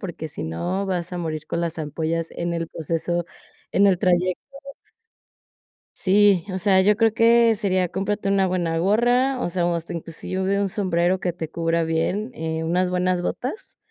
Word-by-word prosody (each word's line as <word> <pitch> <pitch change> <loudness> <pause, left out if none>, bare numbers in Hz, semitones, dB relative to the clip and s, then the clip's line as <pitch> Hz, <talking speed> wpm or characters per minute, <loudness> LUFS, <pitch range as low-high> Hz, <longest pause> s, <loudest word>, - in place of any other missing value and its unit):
porque 170 -4 -6
si 150 - -6
no 180 - -2
vas 180 -1 -3
a 180 - -3
morir 155 -2 -4
con 170 - -2
las 170 -1 -3
ampollas 160 +2 -2
en 170 0 -3
el 165 -1 -3
proceso, 165 +2 -2 0.5
en 200 +1 +4
el 185 -3 +3
trayecto. 180 0 +2 1.6
Sí, 200 -2 +4
o - - -1
sea, 190 0 +4
yo 210 +2 +4
creo 225 -1 +3
que 230 0 +5
sería, 185 -4 0
cómprate 200 +1 -2
una 195 -1 +3
buena 170 -3 -1
gorra, 245 +7 +2
o - - -1
sea, 175 -1 0
hasta 170 0 -5
inclusive 185 +4 -2
un 195 - 0
sombrero 180 -2 +1
que 175 -3 -2
te 160 -3 -6
cubra 165 0 0
bien, 180 +8 -1
eh, 160 -4 -3
unas 180 +2 +1
buenas 180 0 0
botas, 255 - -5
180 Hz, 175 wpm, -23 LUFS, 165-200 Hz, 1.6 s, que